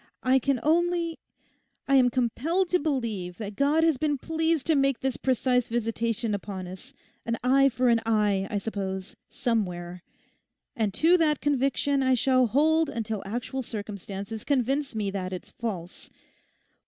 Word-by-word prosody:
I 260 +1 +4
can 275 -1 0
only—I 335 -3 -2
am 250 -2 +5
compelled 280 +10 0
to 360 - +3
believe 225 - -2
that 210 -2 -6
God 290 +5 +2
has 325 -4 +3
been 295 -2 +1
pleased 320 +1 0
to 320 - +3
make 275 -3 +2
this 265 -2 -1
precise 250 -1 +1
visitation 230 -1 -1
upon 195 -2 -5
us—an 230 +4 -8
eye 275 +2 +5
for 250 +1 0
an 230 -1 +4
eye, 210 -3 +1
I 210 - -1
suppose, 195 -2 -4
somewhere. 180 -6 -2 0.7
And 220 -5 0
to 340 +3 +5
that 300 -3 +2
conviction 275 0 +1
I 260 -1 +3
shall 255 0 +3
hold 315 +6 +3
until 220 -3 -3
actual 245 +5 -3
circumstances 205 -1 -6
convince 275 0 0
me 205 -2 -1
that 185 -2 -4
it's 180 - -7
false. 190 -7 -6
245 Hz, 145 wpm, -27 LUFS, 210-280 Hz, 0.7 s, am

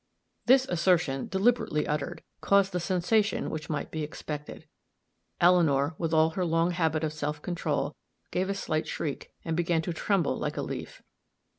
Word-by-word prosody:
_" - - -48
This 260 +1 +6
assertion, 170 -6 +1
deliberately 195 -6 +1
uttered, 150 +3 -3 0.2
caused 200 -1 +4
the 180 - -1
sensation 190 +5 +1
which 155 -1 -5
might 150 -2 -3
be 160 - -3
expected. 150 -1 -6 0.7
Eleanor, 160 -5 +4
with 165 -2 -1
all 160 0 +4
her 185 +3 -2
long 165 +1 +2
habit 160 -2 0
of 155 -1 -1
self 150 -1 -3
control, 150 -4 -2 0.4
gave 185 +2 0
a 200 - 0
slight 155 -5 -2
shriek, 145 -4 -4
and 165 -1 -1
began 165 -1 +1
to 170 - -3
tremble 180 -1 +1
like - - -3
a - - -1
leaf. - - -6
165 Hz, 165 wpm, -28 LUFS, 155-180 Hz, 0.7 s, This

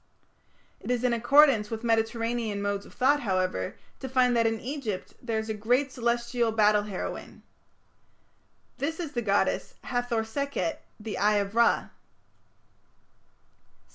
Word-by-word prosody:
It - - -9
is 250 -1 0
in 250 -1 +2
accordance 240 -2 +5
with 225 0 -5
Mediterranean 230 -1 0
modes 200 0 -2
of - - -16
thought, 280 +3 +3
however, 185 - -1 0.2
to 265 - -6
find 250 -1 +3
that 230 -1 +3
in 225 0 -1
Egypt 245 -7 -5
there 230 -3 -2
is 220 0 -3
a 220 - -2
great 245 +6 +1
celestial 235 -1 0
battle 210 -1 +4
heroine. 205 -3 -6 1.4
This 320 +4 -2
is 325 -5 -4
the 240 - -2
goddess 200 -2 0
Hathor 245 -2 -1
Sekhet, 225 - -3 0.2
the 210 -2 -5
"Eye 210 +2 +3
of 200 0 -1
Ra". 235 0 +3
230 Hz, 140 wpm, -27 LUFS, 210-250 Hz, 1.4 s, accordance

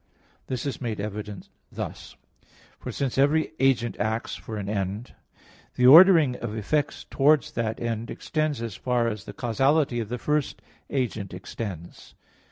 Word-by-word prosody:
This 130 0 -3
is 140 -2 -4
made 115 -4 -3
evident 105 -1 -6 0.2
thus. - - -7 0.6
For - - -6
since 135 -1 -2
every 150 +4 +3
agent 125 -3 +2
acts 110 +4 -1
for 110 - -7
an 100 -1 -4
end, 100 +3 -3 0.6
the 125 - +2
ordering 160 -2 +8
of 105 - -5
effects 145 +7 -1
towards 145 0 +3
that 110 -1 -2
end 115 -1 -3
extends 155 -5 -2
as 115 -4 -5
far 125 -2 0
as 105 -3 -4
the - - -8
causality 135 +2 +1
of 110 -3 -4
the 125 - -3
first 150 +3 -1 0.3
agent 110 -8 -2
extends. 90 -2 -8
120 Hz, 150 wpm, -26 LUFS, 105-140 Hz, 0.6 s, ordering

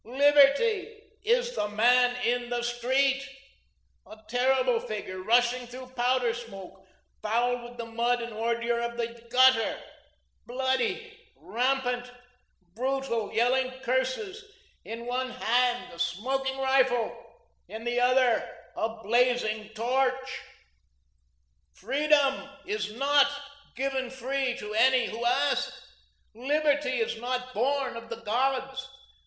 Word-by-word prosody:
Liberty 290 - +3
is 485 +3 +1
the 210 - -1
Man 245 +4 +4
In 245 0 0
the 240 -1 -2
Street, 260 +3 +1 0.9
a 215 - -12
terrible 250 +1 +2
figure, 195 -4 -6
rushing 240 +4 +2
through 255 +1 -10
powder 245 -1 +1
smoke, 195 -5 -10 0.3
fouled 240 +3 0
with 240 0 -11
the 235 - -5
mud 235 +2 0
and 235 -1 -7
ordure 235 +1 -1
of 235 0 -3
the 235 0 -4
gutter, 255 -2 +4 0.7
bloody, 260 - -1 0.2
rampant, 250 0 -1 0.6
brutal, 255 -2 -2
yelling 255 +3 +2
curses, 260 - -1 0.4
in 230 +1 -7
one 255 +1 -2
hand 245 0 0
a 170 - -12
smoking 265 +9 -1
rifle, 265 -3 +2 0.5
in 220 +1 -8
the 240 +1 0
other, 250 -1 +3 0.3
a 225 0 -3
blazing 225 -2 +1
torch. 260 +3 -1 1.3
"Freedom 275 +3 +1 0.2
is 210 0 -3
NOT 280 +4 +4 0.5
given 265 -1 -2
free 265 0 -2
to 210 -4 -6
any 250 +3 +4
who 230 +2 -5
ask; 240 - +1 0.6
Liberty 290 +4 +1
is 335 - -2
not 255 +1 -3
born 265 +2 0
of 230 0 -9
the 230 0 -7
gods. 265 +3 -1
250 Hz, 115 wpm, -28 LUFS, 235-265 Hz, 1.3 s, Man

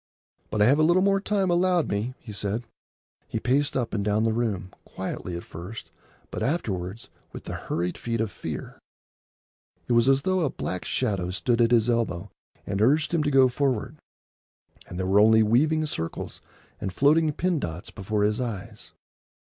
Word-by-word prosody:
"But 105 -1 +2
I - - +6
have 140 +6 +4
a - - +5
little 175 +4 +4
more 195 0 +3
time 195 -3 +1
allowed 175 -1 +2
me," 110 +6 -2
he 115 - -11
said. 105 +3 -2 0.6
He - - -3
paced 140 +3 +1
up 120 -3 -2
and 105 -2 0
down 105 +1 +1
the 115 -1 +2
room, 105 -5 -2
quietly 90 -1 -5
at 85 - -7
first, 90 +7 -9 0.4
but - - -5
afterwards 110 - -2 0.2
with - - -9
the - - -6
hurried 90 +1 -3
feet 115 -1 -2
of 110 -2 -1
fear. 80 -6 -6 1.1
It 120 - +1
was 120 +2 +4
as 135 0 +3
though 185 0 +1
a 155 - +1
black 90 -7 -4
shadow 100 -8 -1
stood 115 +6 +1
at 115 - +4
his 115 -2 +4
elbow 105 -5 -1 0.3
and 100 0 -2
urged 150 +9 +3
him 165 - +3
to 150 - +1
go 135 -2 +6
forward; 130 +1 -1 0.9
and 90 - -8
there 95 - -1
were 95 +2 +4
only 110 +1 +6
weaving 155 +8 +3
circles 80 - -5 0.4
and 95 - -3
floating 150 - +3
pin 175 +2 0
dots 90 - -5
before 105 +1 -2
his 105 +4 +1
eyes. 110 -2 -6
115 Hz, 180 wpm, -26 LUFS, 100-145 Hz, 1.1 s, I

